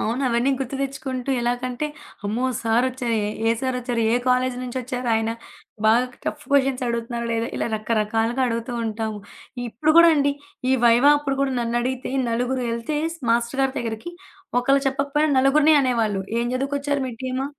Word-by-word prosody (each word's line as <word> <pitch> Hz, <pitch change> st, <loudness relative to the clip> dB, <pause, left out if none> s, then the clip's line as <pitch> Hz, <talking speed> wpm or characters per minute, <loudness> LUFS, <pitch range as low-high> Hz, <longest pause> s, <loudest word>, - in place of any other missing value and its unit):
అవును. 235 Hz, +5 st, -1 dB
అవన్నీ 240 Hz, +3 st, +2 dB
గుర్తు 270 Hz, 0 st, -4 dB
తెచ్చుకుంటూ 275 Hz, -1 st, -3 dB
ఎలాగంటే, 245 Hz, +3 st, -2 dB, 0.4 s
అమ్మో! 225 Hz, +5 st, -1 dB, 0.2 s
సారొచ్చారే, 235 Hz, 0 st, 0 dB, 0.3 s
ఏ -, -, +4 dB
సారొచ్చారు, 250 Hz, -2 st, -1 dB
ఏ -, -, +4 dB
కాలేజీ 255 Hz, 0 st, +2 dB
నుంచొచ్చారు, 250 Hz, 0 st, -4 dB
ఆయన 225 Hz, 0 st, 0 dB, 0.6 s
బాగా 230 Hz, +3 st, +5 dB, 0.2 s
టఫ్ 295 Hz, -, -4 dB
క్వెషన్స్ 270 Hz, -2 st, +2 dB
అడుగుతున్నాడె. 235 Hz, 0 st, -2 dB, 0.2 s
ఇలా -, -, -1 dB
రకరకాలుగా 225 Hz, +3 st, 0 dB
అడుగుతూ 230 Hz, +1 st, -3 dB
ఉంటాము. 220 Hz, -1 st, -3 dB, 0.5 s
ఇప్పుడు 250 Hz, +8 st, 0 dB
గూడా 335 Hz, 0 st, +9 dB
అండి, 285 Hz, -1 st, +2 dB, 0.4 s
ఈ -, -, +4 dB
వైవా 240 Hz, +5 st, +6 dB
అప్పుడు 275 Hz, -2 st, -2 dB
కూడా 275 Hz, -1 st, +1 dB
నన్నడిగితే, 240 Hz, +2 st, -2 dB, 0.2 s
నలుగురెళ్తే 240 Hz, +2 st, -1 dB, 0.3 s
మాస్టర్ 235 Hz, +3 st, 0 dB
గారి 270 Hz, -, +1 dB
దగ్గరికి, 230 Hz, +8 st, -5 dB, 0.5 s
ఒకళ్ళు 275 Hz, +2 st, +3 dB
చెప్పకపోయినా, 280 Hz, +3 st, +1 dB
నలుగురిని 295 Hz, +4 st, +5 dB
అనేవాళ్ళు. 225 Hz, -7 st, 0 dB, 0.2 s
"ఏం 235 Hz, -, 0 dB
చదువుకొచ్చారు, 280 Hz, +1 st, -1 dB
మీ 245 Hz, -, -6 dB
టీము 255 Hz, +1 st, -2 dB
250 Hz, 140 wpm, -23 LUFS, 235-270 Hz, 0.6 s, గూడా